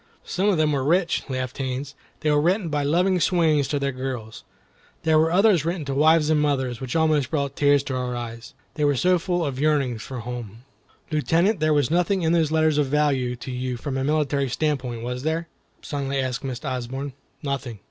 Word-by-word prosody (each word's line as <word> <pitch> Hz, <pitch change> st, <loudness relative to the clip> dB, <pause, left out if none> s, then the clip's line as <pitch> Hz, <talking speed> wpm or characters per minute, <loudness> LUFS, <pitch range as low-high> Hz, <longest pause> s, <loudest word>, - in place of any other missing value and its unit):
"Some 195 Hz, +3 st, 0 dB
of 195 Hz, -, +2 dB
them 155 Hz, -1 st, +2 dB
were 140 Hz, -2 st, 0 dB
rich," 170 Hz, +4 st, +2 dB
laughed 130 Hz, -1 st, -4 dB
Haines; 135 Hz, +1 st, -3 dB, 0.3 s
"they 155 Hz, -, +2 dB
were 145 Hz, 0 st, +3 dB
written 180 Hz, +2 st, +1 dB
by 150 Hz, -1 st, 0 dB
loving 180 Hz, +6 st, +2 dB
swains 160 Hz, -5 st, +2 dB
to 145 Hz, -, -1 dB
their 140 Hz, 0 st, -1 dB
girls. 130 Hz, -4 st, -6 dB, 0.6 s
There 160 Hz, -1 st, +4 dB
were 160 Hz, +1 st, +3 dB
others 190 Hz, -3 st, +4 dB
written 170 Hz, -1 st, -2 dB
to 140 Hz, -, -2 dB
wives 155 Hz, +2 st, +4 dB
and 150 Hz, -1 st, +3 dB
mothers, 130 Hz, -5 st, 0 dB
which 130 Hz, +3 st, -4 dB
almost 155 Hz, -4 st, +2 dB
brought 140 Hz, -3 st, -2 dB
tears 145 Hz, -1 st, +3 dB
to 135 Hz, -, -4 dB
our 125 Hz, -1 st, -2 dB
eyes, 115 Hz, -1 st, -7 dB, 0.2 s
they 150 Hz, -, -2 dB
were 145 Hz, -1 st, +3 dB
so 180 Hz, +6 st, +3 dB
full 175 Hz, 0 st, -1 dB
of 135 Hz, -3 st, -3 dB
yearnings 140 Hz, -6 st, +1 dB
for 125 Hz, +2 st, -6 dB
home." 120 Hz, -1 st, -7 dB, 0.5 s
"Lieutenant, 165 Hz, +6 st, +2 dB
there 155 Hz, 0 st, +2 dB
was 145 Hz, -2 st, +2 dB
nothing 180 Hz, +2 st, +1 dB
in 160 Hz, -, +2 dB
those 165 Hz, -3 st, +2 dB
letters 155 Hz, -1 st, +2 dB
of 145 Hz, -, +2 dB
value 135 Hz, -4 st, +1 dB
to 125 Hz, +2 st, -7 dB
you 125 Hz, 0 st, -3 dB
from 135 Hz, +2 st, -4 dB
a 135 Hz, -, -1 dB
military 140 Hz, -2 st, +1 dB
standpoint, 125 Hz, -4 st, -2 dB
was 125 Hz, +1 st, -4 dB
there?" 160 Hz, +3 st, -1 dB, 0.4 s
suddenly 140 Hz, -1 st, -2 dB
asked 130 Hz, -1 st, -2 dB
Miss 130 Hz, -2 st, -5 dB
Osborne. 130 Hz, +2 st, -4 dB, 0.3 s
"Nothing." 135 Hz, -5 st, -3 dB
145 Hz, 205 wpm, -24 LUFS, 130-160 Hz, 0.6 s, There